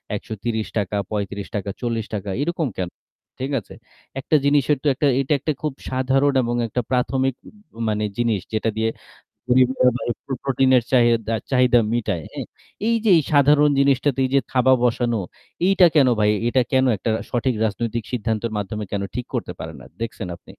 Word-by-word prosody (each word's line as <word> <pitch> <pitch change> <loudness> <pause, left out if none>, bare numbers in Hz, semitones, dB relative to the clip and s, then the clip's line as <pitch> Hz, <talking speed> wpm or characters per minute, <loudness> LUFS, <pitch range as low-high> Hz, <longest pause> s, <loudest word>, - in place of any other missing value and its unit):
৳১৩০, 110 -2 -3
৳৩৫, 100 -1 -4
৳৪০ 110 -4 -3
এরকম 170 -1 -1
কেনো? 90 -2 -3 0.5
ঠিক 135 +2 -3
আছে? - - -14 0.5
একটা 155 - 0
জিনিসের 145 0 +3
তো 150 - 0
একটা 145 +3 +1
এটা 135 - 0
একটা 150 +2 -1
খুব 150 -3 -2 0.2
সাধারণ 135 +2 +2
এবং 120 +1 -1
একটা 125 +3 -1
প্রাথমিক 130 +1 +1 0.6
মানে 105 0 -1
জিনিস 115 -4 +1
যেটা 110 +1 0
দিয়ে 110 0 +1 0.6
গরিবের 125 0 +4
ভাই 120 - -4 0.2
প্র 135 - -4
প্রোটিনের 130 -2 +3
চাহিদা 115 -3 +3 0.2
চাহিদা 125 -2 +4
মিটায়, 105 -9 -1
হ্যাঁ? - - -5 0.4
এই 230 - +3
যে - - +4
এই 155 - +2
সাধারণ 145 +1 +5
জিনিসটাতে 140 -1 +2
এই 130 - -2
যে - - +6
থাবা 130 0 +4
বসানো, 120 -2 +1 0.5
এইটা 190 -2 +6
কেনো 135 -4 +5
ভাই? 105 0 +4 0.2
এটা 130 +2 +3
কেনো 130 0 +3
একটা 110 - -3 0.2
সঠিক 125 0 0
রাজনৈতিক 115 +2 -2
সিদ্ধান্তের 115 -1 -2
মাধ্যমে 105 +1 -4
কেনো 100 -1 -2
ঠিক 125 - -3
করতে - - -3
পারে 80 0 -6
না? 65 - -13 0.2
দেখছেন 110 -5 -5
আপনি? - - -23
120 Hz, 165 wpm, -22 LUFS, 110-135 Hz, 0.6 s, যে